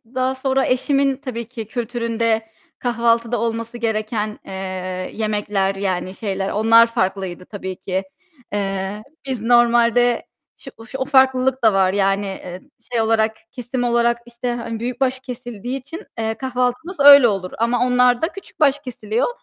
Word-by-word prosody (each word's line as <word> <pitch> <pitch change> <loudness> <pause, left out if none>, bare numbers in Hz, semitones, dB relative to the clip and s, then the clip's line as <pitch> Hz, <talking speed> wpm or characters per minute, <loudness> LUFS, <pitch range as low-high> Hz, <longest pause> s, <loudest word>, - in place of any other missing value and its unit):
daha 260 +1 0
sonra 265 0 +1
eşimin 275 +1 +1
tabii 240 -4 -6
ki 225 -4 -7
kültüründe 230 -1 -1 0.3
kahvaltıda 235 -1 +1
olması 230 +1 -3
gereken, 215 -2 -2
eee, - - -9 0.6
yemekler 205 -3 -1
yani 185 -1 -2
şeyler 195 -2 -3
onlar 225 +2 +6
farklıydı 185 -4 -2
tabii 190 -2 -6
ki. 190 +1 -3 0.5
Eee, 195 0 -2 0.2
biz 260 -5 -3
normalde 240 0 +3 0.3
şu 225 - -13
şu 255 +3 -7
o 265 - -1
farklılık 265 -1 +3
da 220 -2 +5
var 190 -1 +3
yani, 195 0 +1
eee, 185 -2 -7 0.3
şey 235 -2 +1
olarak, 220 0 +2 0.2
kesim 245 0 -4
olarak 235 0 +2
işte 240 +1 -4
hani 230 -1 -5
büyükbaş 255 +2 -1
kesildiği 245 -1 -6
için, 330 - -9
eee, 220 0 -1
kahvaltımız 255 +7 -2
öyle 280 -2 +9
olur 195 -4 -2
ama 235 +2 +1
onlar 250 -1 +3
da 320 - +2
küçükbaş 300 -7 0
kesiliyor. 230 -4 -2
235 Hz, 140 wpm, -20 LUFS, 210-255 Hz, 0.6 s, öyle